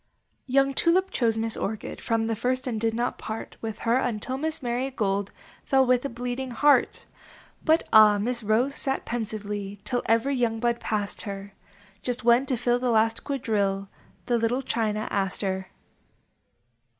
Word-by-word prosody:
Young 275 Hz, +1 st, +3 dB
Tulip 370 Hz, +6 st, +2 dB
chose 225 Hz, -3 st, +1 dB
Miss 225 Hz, 0 st, -1 dB
Orchid 215 Hz, +1 st, -4 dB
From 225 Hz, -1 st, 0 dB
the 225 Hz, 0 st, -1 dB
first, 255 Hz, +4 st, -1 dB
and 225 Hz, -4 st, -2 dB
did 225 Hz, -1 st, +1 dB
not 240 Hz, +1 st, -1 dB
part 220 Hz, +1 st, -6 dB
With 220 Hz, -2 st, -4 dB
her 230 Hz, +2 st, +4 dB
until 250 Hz, 0 st, -1 dB
Miss 310 Hz, +1 st, -3 dB
Mary 245 Hz, +2 st, -1 dB
Gold 200 Hz, -5 st, -1 dB, 0.3 s
Fell 265 Hz, -1 st, +3 dB
with 250 Hz, -1 st, +3 dB
a 280 Hz, -, -2 dB
Bleeding 245 Hz, +2 st, -4 dB
Heart. 285 Hz, +5 st, +3 dB, 0.6 s
But 320 Hz, 0 st, +3 dB
ah! 215 Hz, -1 st, +8 dB
Miss 240 Hz, +4 st, -1 dB
Rose 225 Hz, +6 st, +1 dB
sat 270 Hz, -1 st, -3 dB
pensively 210 Hz, -3 st, -4 dB
Till 245 Hz, -1 st, -1 dB
every 230 Hz, +5 st, +2 dB
young 230 Hz, -3 st, 0 dB
bud 235 Hz, 0 st, 0 dB
passed 205 Hz, -2 st, -2 dB
her: 200 Hz, -1 st, -7 dB, 0.7 s
When 235 Hz, +1 st, +6 dB
just 270 Hz, -, -7 dB
to 255 Hz, -, +1 dB
fill 240 Hz, +1 st, +1 dB
the 250 Hz, 0 st, 0 dB
last 225 Hz, 0 st, +2 dB
quadrille, 205 Hz, -8 st, -1 dB, 0.4 s
The 240 Hz, -1 st, +1 dB
little 240 Hz, +4 st, 0 dB
China 215 Hz, -3 st, -1 dB
Aster. 190 Hz, -1 st, -1 dB
235 Hz, 160 wpm, -26 LUFS, 215-255 Hz, 0.7 s, ah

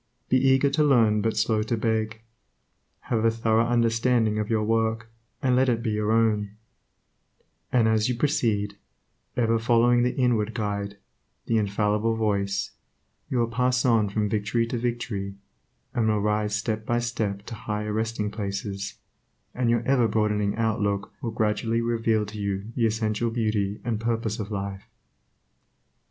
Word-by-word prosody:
Be 130 Hz, -, +4 dB
eager 135 Hz, +1 st, +3 dB
to 150 Hz, +2 st, +2 dB
learn, 115 Hz, -7 st, +4 dB
but 110 Hz, +1 st, -1 dB
slow 110 Hz, 0 st, +2 dB
to 110 Hz, +2 st, -1 dB
beg. 110 Hz, 0 st, -1 dB, 0.8 s
Have 110 Hz, -2 st, -1 dB
a 115 Hz, -, +5 dB
thorough 115 Hz, 0 st, +1 dB
understanding 115 Hz, -1 st, +2 dB
of 105 Hz, -, -2 dB
your 110 Hz, -2 st, +1 dB
work, 110 Hz, 0 st, 0 dB, 0.3 s
and 130 Hz, -2 st, +3 dB
let 130 Hz, +1 st, +3 dB
it 115 Hz, -1 st, 0 dB
be 115 Hz, -, 0 dB
your 105 Hz, 0 st, 0 dB
own; 105 Hz, -2 st, +1 dB, 1.2 s
and 120 Hz, -3 st, +3 dB
as 110 Hz, +1 st, +2 dB
you 125 Hz, -, 0 dB
proceed, 110 Hz, -7 st, 0 dB, 0.6 s
ever 115 Hz, -1 st, +2 dB
following 120 Hz, +1 st, +4 dB
the 125 Hz, +1 st, 0 dB
inward 115 Hz, -4 st, +1 dB
Guide, 100 Hz, -2 st, -3 dB, 0.5 s
the 115 Hz, -, +1 dB
infallible 105 Hz, +2 st, +1 dB
Voice, 100 Hz, -3 st, -1 dB, 0.6 s
you 130 Hz, -, -1 dB
will 120 Hz, -1 st, +2 dB
pass 125 Hz, +2 st, +1 dB
on 115 Hz, -4 st, +3 dB
from 105 Hz, +1 st, 0 dB
victory 110 Hz, +3 st, 0 dB
to 120 Hz, +1 st, -3 dB
victory, 115 Hz, -5 st, -3 dB, 0.6 s
and 115 Hz, -2 st, +1 dB
will 105 Hz, -1 st, +2 dB
rise 105 Hz, 0 st, 0 dB
step 110 Hz, 0 st, -2 dB
by 120 Hz, +2 st, 0 dB
step 110 Hz, -5 st, -2 dB
to -, -, -7 dB
higher 105 Hz, -1 st, -3 dB
resting 110 Hz, -1 st, -2 dB
places, 100 Hz, -1 st, -4 dB, 0.6 s
and 125 Hz, -1 st, 0 dB
your 120 Hz, 0 st, +2 dB
ever 125 Hz, -2 st, +3 dB
broadening 105 Hz, -1 st, 0 dB
outlook 105 Hz, -3 st, -1 dB
will 115 Hz, -, -2 dB
gradually 110 Hz, +1 st, 0 dB
reveal 115 Hz, -2 st, +1 dB
to 105 Hz, +1 st, -8 dB
you 100 Hz, +1 st, -3 dB
the 115 Hz, -3 st, +3 dB
essential 110 Hz, +1 st, -1 dB
beauty 110 Hz, -3 st, -1 dB
and 115 Hz, -3 st, -1 dB
purpose 115 Hz, -1 st, -1 dB
of 105 Hz, -1 st, -4 dB
life. 100 Hz, -2 st, -5 dB
110 Hz, 155 wpm, -25 LUFS, 105-115 Hz, 1.2 s, a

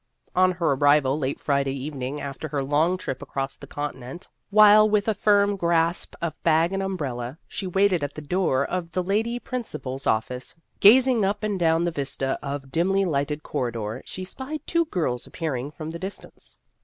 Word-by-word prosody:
On 185 Hz, 0 st, +4 dB
her 170 Hz, -3 st, 0 dB
arrival 145 Hz, 0 st, +3 dB
late 135 Hz, -1 st, -2 dB
Friday 140 Hz, -1 st, 0 dB
evening 140 Hz, 0 st, -4 dB
after 140 Hz, +2 st, -5 dB
her 140 Hz, -2 st, -2 dB
long 155 Hz, +6 st, +2 dB
trip 135 Hz, -7 st, -5 dB
across 135 Hz, 0 st, -4 dB
the -, -, -12 dB
continent, 145 Hz, +2 st, -6 dB, 0.2 s
while 215 Hz, +1 st, +7 dB
with 210 Hz, 0 st, +1 dB
a 220 Hz, -, +3 dB
firm 205 Hz, -1 st, +3 dB
grasp 170 Hz, -1 st, +1 dB
of 170 Hz, -, -3 dB
bag 165 Hz, +2 st, +3 dB
and 195 Hz, -, -1 dB
umbrella 140 Hz, -9 st, -4 dB
she 195 Hz, -, -5 dB
waited 190 Hz, -3 st, +2 dB
at 145 Hz, 0 st, -4 dB
the 155 Hz, -, -6 dB
door 145 Hz, -5 st, +1 dB
of 180 Hz, -2 st, -3 dB
the 185 Hz, -, 0 dB
Lady 220 Hz, +6 st, 0 dB
Principal's 215 Hz, -, -5 dB
office, 125 Hz, +4 st, -1 dB, 0.2 s
gazing 245 Hz, +2 st, +6 dB
up 205 Hz, +2 st, -1 dB
and 205 Hz, -3 st, -1 dB
down 165 Hz, 0 st, +3 dB
the 175 Hz, -, 0 dB
vista 135 Hz, -3 st, -2 dB
of 140 Hz, -1 st, -5 dB
dimly 195 Hz, +6 st, +2 dB
lighted 150 Hz, -2 st, -1 dB
corridor, 115 Hz, -1 st, -3 dB
she 185 Hz, -, -7 dB
spied 270 Hz, +10 st, -6 dB
two 335 Hz, 0 st, +1 dB
girls 155 Hz, -, -2 dB
appearing 140 Hz, -5 st, -3 dB
from 155 Hz, +1 st, -7 dB
the 170 Hz, -, -7 dB
distance. 190 Hz, +3 st, -9 dB
165 Hz, 180 wpm, -25 LUFS, 140-195 Hz, 0.2 s, while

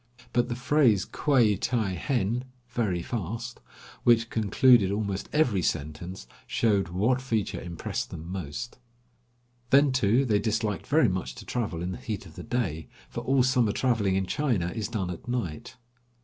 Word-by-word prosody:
But 120 Hz, -1 st, +2 dB
the 120 Hz, -, -2 dB
phrase 125 Hz, -6 st, +3 dB
quai 120 Hz, -8 st, +3 dB
ti 110 Hz, -3 st, 0 dB
henn 120 Hz, -, -1 dB, 0.2 s
(very 105 Hz, -8 st, -1 dB
fast), 115 Hz, +3 st, -5 dB, 0.4 s
which 115 Hz, -1 st, +4 dB
concluded 110 Hz, 0 st, +4 dB
almost 100 Hz, -1 st, -2 dB
every 130 Hz, -11 st, +2 dB
sentence, 80 Hz, +1 st, -3 dB, 0.2 s
showed 100 Hz, -5 st, +2 dB
what 110 Hz, +9 st, +1 dB
feature 115 Hz, -6 st, -2 dB
impressed 85 Hz, -1 st, -4 dB
them 80 Hz, -, -8 dB
most. 90 Hz, -, -6 dB, 0.9 s
Then, 140 Hz, +1 st, +5 dB
too, 130 Hz, +1 st, +3 dB
they 105 Hz, -4 st, +2 dB
disliked 110 Hz, -1 st, -1 dB
very 150 Hz, -3 st, +4 dB
much 90 Hz, -, -3 dB
to -, -, -10 dB
travel 100 Hz, -9 st, -2 dB
in 90 Hz, -, -2 dB
the -, -, -6 dB
heat 105 Hz, -4 st, -5 dB
of 80 Hz, -, -13 dB
the -, -, -7 dB
day, 95 Hz, -11 st, -2 dB, 0.2 s
for -, -, -5 dB
all 135 Hz, -1 st, +3 dB
summer 125 Hz, -5 st, +2 dB
traveling 115 Hz, -7 st, +1 dB
in 95 Hz, 0 st, +1 dB
China 115 Hz, -, 0 dB
is 110 Hz, -2 st, -3 dB
done 100 Hz, -6 st, -2 dB
at 85 Hz, -, -9 dB
night. 115 Hz, -5 st, -4 dB
110 Hz, 160 wpm, -27 LUFS, 95-125 Hz, 0.9 s, Then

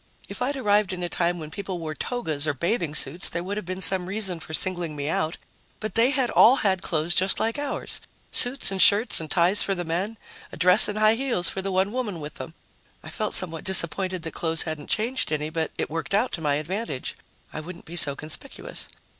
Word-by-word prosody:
If -, -, -8 dB
I'd 275 Hz, +3 st, 0 dB
arrived 210 Hz, -5 st, +2 dB
in 180 Hz, -1 st, -5 dB
a 175 Hz, -, -2 dB
time 175 Hz, 0 st, 0 dB
when 155 Hz, -2 st, -8 dB
people 195 Hz, +1 st, -5 dB
wore 160 Hz, -2 st, -5 dB
togas 155 Hz, -, -2 dB
or 150 Hz, -, 0 dB
bathing 170 Hz, -, -1 dB
suits, 160 Hz, +4 st, +1 dB
there 170 Hz, +1 st, -4 dB
would 195 Hz, +3 st, -4 dB
have 210 Hz, -4 st, -5 dB
been 185 Hz, +1 st, -4 dB
some 185 Hz, -2 st, +3 dB
reason 190 Hz, -3 st, -2 dB
for 160 Hz, -, -9 dB
singling 175 Hz, -1 st, -1 dB
me 145 Hz, 0 st, -4 dB
out, 155 Hz, +1 st, -1 dB, 0.4 s
but 215 Hz, -3 st, -4 dB
they 230 Hz, +3 st, +4 dB
had 270 Hz, -4 st, 0 dB
all 245 Hz, -, +7 dB
had 190 Hz, -2 st, +2 dB
clothes 165 Hz, -2 st, -1 dB
just 190 Hz, +2 st, +2 dB
like 225 Hz, +5 st, -1 dB
ours 290 Hz, -1 st, -4 dB, 0.3 s
suits 245 Hz, -3 st, +3 dB
and 190 Hz, -1 st, +1 dB
shirts 205 Hz, +5 st, +5 dB
and 160 Hz, -1 st, -7 dB
ties 175 Hz, +6 st, +3 dB
for 195 Hz, -, +2 dB
the 175 Hz, -1 st, -4 dB
men, 185 Hz, +7 st, -2 dB, 0.3 s
a -, -, -9 dB
dress 180 Hz, +3 st, +7 dB
and 210 Hz, -, -3 dB
high 215 Hz, 0 st, +5 dB
heels 235 Hz, -8 st, +1 dB
for 190 Hz, -, -4 dB
the 195 Hz, 0 st, -3 dB
one 190 Hz, +2 st, +1 dB
woman 220 Hz, -8 st, -3 dB
with 150 Hz, 0 st, -7 dB
them. 165 Hz, -, -9 dB, 0.5 s
I -, -, -8 dB
felt 215 Hz, -2 st, -1 dB
somewhat 165 Hz, -4 st, +1 dB
disappointed 185 Hz, 0 st, +2 dB
that 165 Hz, -, -4 dB
clothes 165 Hz, -1 st, -1 dB
hadn't 155 Hz, -3 st, -5 dB
changed 235 Hz, +1 st, 0 dB
any, 155 Hz, 0 st, -2 dB
but 160 Hz, -1 st, -2 dB
it -, -, -1 dB
worked 165 Hz, +4 st, -2 dB
out 230 Hz, +5 st, +1 dB
to 165 Hz, -, -4 dB
my 145 Hz, -2 st, +1 dB
advantage; 155 Hz, -, -4 dB, 0.4 s
I -, -, -4 dB
wouldn't 170 Hz, +3 st, -9 dB
be 170 Hz, -, -9 dB
so 145 Hz, -5 st, +1 dB
conspicuous. 155 Hz, -, -4 dB
180 Hz, 225 wpm, -25 LUFS, 160-210 Hz, 0.5 s, all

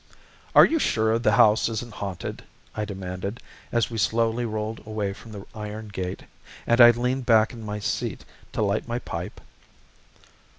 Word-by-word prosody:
"Are -, -, +10 dB
you 325 Hz, -, +1 dB
sure 110 Hz, -, +2 dB
the 110 Hz, -2 st, +2 dB
house 105 Hz, +2 st, +5 dB
isn't 115 Hz, 0 st, -5 dB
haunted?" 100 Hz, -4 st, -5 dB, 0.3 s
I 105 Hz, -, -2 dB
demanded, 95 Hz, +2 st, -5 dB, 0.3 s
as 120 Hz, 0 st, +1 dB
we 115 Hz, -, -3 dB
slowly 115 Hz, +2 st, +1 dB
rolled 110 Hz, 0 st, -3 dB
away 105 Hz, -2 st, -2 dB
from 110 Hz, +3 st, -13 dB
the 100 Hz, -2 st, -8 dB
iron 105 Hz, 0 st, -7 dB
gate, 95 Hz, -3 st, -5 dB, 0.4 s
and 120 Hz, +1 st, +4 dB
I 120 Hz, -, +11 dB
leaned 125 Hz, +2 st, 0 dB
back 110 Hz, -1 st, +4 dB
in 115 Hz, -, -9 dB
my 105 Hz, -1 st, -4 dB
seat 105 Hz, -, -3 dB, 0.3 s
to -, -, 0 dB
light 100 Hz, +2 st, 0 dB
my 120 Hz, 0 st, -2 dB
pipe. 85 Hz, -7 st, -6 dB
110 Hz, 165 wpm, -25 LUFS, 105-115 Hz, 0.4 s, I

